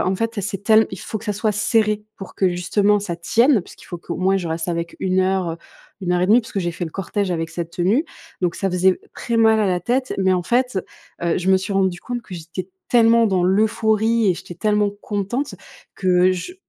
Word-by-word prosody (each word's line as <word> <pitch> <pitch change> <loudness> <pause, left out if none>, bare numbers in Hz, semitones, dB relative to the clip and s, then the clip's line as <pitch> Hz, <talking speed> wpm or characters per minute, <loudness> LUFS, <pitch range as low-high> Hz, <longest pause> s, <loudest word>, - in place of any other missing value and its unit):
en 185 - +1
fait, 230 0 -2
c'est 195 0 -3
tell 220 0 +5
il 190 - -7
faut - - -5
que - - -13
ça 210 - 0
soit 210 +1 0
serré 210 0 +1
pour 195 - -10
que, 190 - +2
justement, 200 +4 +2
ça 175 -4 -4
tienne, 225 - +3
puisqu'il - - -15
faut 175 - -6
qu'au 170 - -6
moins, 190 +2 +2
je 180 -3 -3
reste 165 +1 -3
avec 170 0 -3
1 185 0 +1
heure, 185 -2 0
heu, - - -6 0.5
1:30, 180 +6 +3
puisque 220 -2 -5
j'ai 175 -1 -2
fait 175 - -4
le 160 - -6
cortège 195 +2 -2
avec 165 -2 -2
cette 170 -1 -5
tenue. 195 - +1 0.4
Donc 175 -1 0
ça 195 - -1
faisait 180 +1 +2
très 235 -1 -2
mal 220 -1 +5
à 210 - +2
la 180 -2 0
tête, 255 +7 -1
mais 190 -1 +3
en 180 - 0
fait, 245 +1 +1 0.4
heu, 170 -1 +1
je 185 +1 -3
me 190 - +6
suis 190 +2 -3
rendue 190 -2 +1
compte 245 -1 -4
que 185 - -10
j'étais 170 +2 -7 0.2
tellement 230 -1 +5
dans 190 -4 +1
l'euphorie 220 +3 +2
et 180 - +3
j'étais 175 - -9
tellement 210 +3 +1
contente 205 +6 -3 0.4
que 185 -1 +3
je 185 - -5
195 Hz, 225 wpm, -21 LUFS, 180-220 Hz, 0.5 s, me